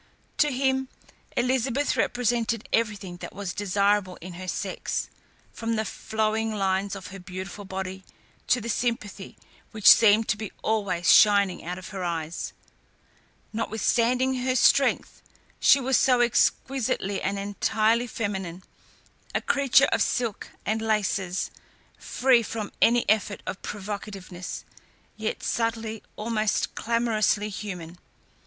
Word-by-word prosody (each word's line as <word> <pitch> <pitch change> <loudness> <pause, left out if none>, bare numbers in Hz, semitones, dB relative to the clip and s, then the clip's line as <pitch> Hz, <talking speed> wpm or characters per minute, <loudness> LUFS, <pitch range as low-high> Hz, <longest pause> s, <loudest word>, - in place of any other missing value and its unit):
To 300 -1 +4
him, 265 0 0 0.5
Elizabeth 255 +2 +1
represented 235 -2 0
everything 205 -5 -1
that - - -9
was 200 -2 -4
desirable 200 -1 +1
in 180 +2 -10
her 185 +2 -8
sex, - - -3 0.4
from 230 0 -2
the 220 0 -1
flowing 220 +1 -1
lines 195 0 0
of 195 - -8
her 195 - -8
beautiful 185 +3 -7
body 190 0 -5 0.4
to 250 - +3
the 230 - -6
sympathy 230 -4 -3 0.3
which 215 -2 -9
seemed 220 0 +7
to 215 - +2
be 215 -1 -6
always 200 -6 +2
shining 200 -3 +5
out 180 +2 -4
of 185 - -9
her 195 -3 -5
eyes. 165 -1 -3 1.0
Notwithstanding 235 +4 +1
her 255 +1 0
strength, 275 +2 +3 0.4
she 280 - +6
was 265 -1 +2
so 250 -2 +4
exquisitely 240 -3 +1
and 200 +1 -1
entirely 215 +4 +1
feminine, 190 -6 -4 0.7
a - - +3
creature 280 -2 +4
of - - +2
silk 235 -5 -1 0.2
and 220 +1 0
laces, 200 -4 -1 0.5
free 250 -2 +3
from 220 -2 -5
any 235 +1 +4
effort 210 -1 +1
of 185 - -5
provocativeness, 200 -3 -6 0.5
yet 220 0 -4
subtly, 225 -1 -2
almost 215 -1 -1
clamorously 220 -3 +1
human. 180 -4 -7
215 Hz, 125 wpm, -26 LUFS, 195-235 Hz, 1.0 s, seemed